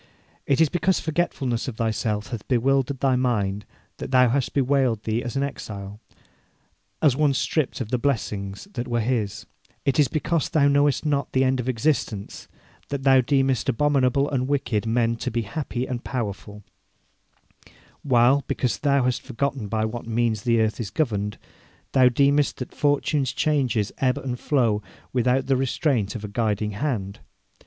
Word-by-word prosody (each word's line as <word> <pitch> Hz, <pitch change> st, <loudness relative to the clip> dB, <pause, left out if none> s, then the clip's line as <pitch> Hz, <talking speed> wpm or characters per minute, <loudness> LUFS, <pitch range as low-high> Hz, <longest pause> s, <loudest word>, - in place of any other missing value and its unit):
It 140 Hz, -, +2 dB
is 160 Hz, -, +6 dB
because 180 Hz, +4 st, +1 dB
forgetfulness 145 Hz, -7 st, -1 dB
of 120 Hz, -4 st, -5 dB
thyself 110 Hz, 0 st, -1 dB
hath 115 Hz, -4 st, -6 dB
bewildered 135 Hz, +1 st, +1 dB
thy 135 Hz, -2 st, +3 dB
mind 105 Hz, -6 st, -1 dB, 0.3 s
that -, -, -6 dB
thou 125 Hz, -1 st, +5 dB
hast 135 Hz, +1 st, -1 dB
bewailed 130 Hz, -5 st, +2 dB
thee 110 Hz, +1 st, -1 dB
as 120 Hz, +1 st, -5 dB
an 135 Hz, -, +1 dB
exile, 100 Hz, -7 st, -6 dB, 1.0 s
as 145 Hz, -5 st, +5 dB
one 145 Hz, -1 st, +2 dB
stripped 145 Hz, +1 st, -1 dB
of 110 Hz, -, -4 dB
the 125 Hz, -, +1 dB
blessings 105 Hz, -, -2 dB
that 120 Hz, -1 st, -4 dB
were 120 Hz, -1 st, 0 dB
his; 110 Hz, -4 st, -1 dB, 0.4 s
it 140 Hz, +2 st, +1 dB
is 145 Hz, -, +5 dB
because 155 Hz, +4 st, -1 dB
thou 145 Hz, -3 st, +3 dB
knowest 145 Hz, +1 st, +2 dB
not 140 Hz, -3 st, -1 dB
the 130 Hz, -, +3 dB
end 130 Hz, 0 st, +1 dB
of 125 Hz, +1 st, -2 dB
existence 115 Hz, -5 st, -2 dB, 0.4 s
that 140 Hz, -1 st, -3 dB
thou 135 Hz, -1 st, +6 dB
deemest 135 Hz, -1 st, +1 dB
abominable 140 Hz, +1 st, +2 dB
and 130 Hz, -3 st, -1 dB
wicked 125 Hz, -6 st, -1 dB
men 115 Hz, 0 st, +1 dB
to -, -, -3 dB
be 115 Hz, +1 st, -1 dB
happy 130 Hz, +1 st, -4 dB
and 125 Hz, -2 st, -5 dB
powerful; 105 Hz, -4 st, -5 dB, 1.4 s
while, 130 Hz, +1 st, +4 dB
because 125 Hz, -, -1 dB
thou 140 Hz, -2 st, +2 dB
hast 125 Hz, -1 st, 0 dB
forgotten 135 Hz, -2 st, -3 dB
by 110 Hz, +2 st, 0 dB
what 115 Hz, +1 st, -5 dB
means 115 Hz, -2 st, 0 dB
the 115 Hz, +1 st, +2 dB
earth 110 Hz, +1 st, 0 dB
is 110 Hz, -5 st, -3 dB
governed, 105 Hz, -8 st, -1 dB, 0.5 s
thou 130 Hz, -1 st, +5 dB
deemest 140 Hz, +3 st, +2 dB
that 125 Hz, -, -7 dB
fortune's 145 Hz, -2 st, +1 dB
changes 135 Hz, -7 st, 0 dB
ebb 130 Hz, -1 st, +2 dB
and 125 Hz, -2 st, -4 dB
flow 115 Hz, -8 st, +1 dB, 0.3 s
without 125 Hz, +1 st, +2 dB
the 135 Hz, -, +2 dB
restraint 130 Hz, -5 st, 0 dB
of 110 Hz, -, -6 dB
a -, -, -5 dB
guiding 105 Hz, -1 st, -1 dB
hand. 105 Hz, -4 st, -3 dB
125 Hz, 165 wpm, -24 LUFS, 110-140 Hz, 1.4 s, is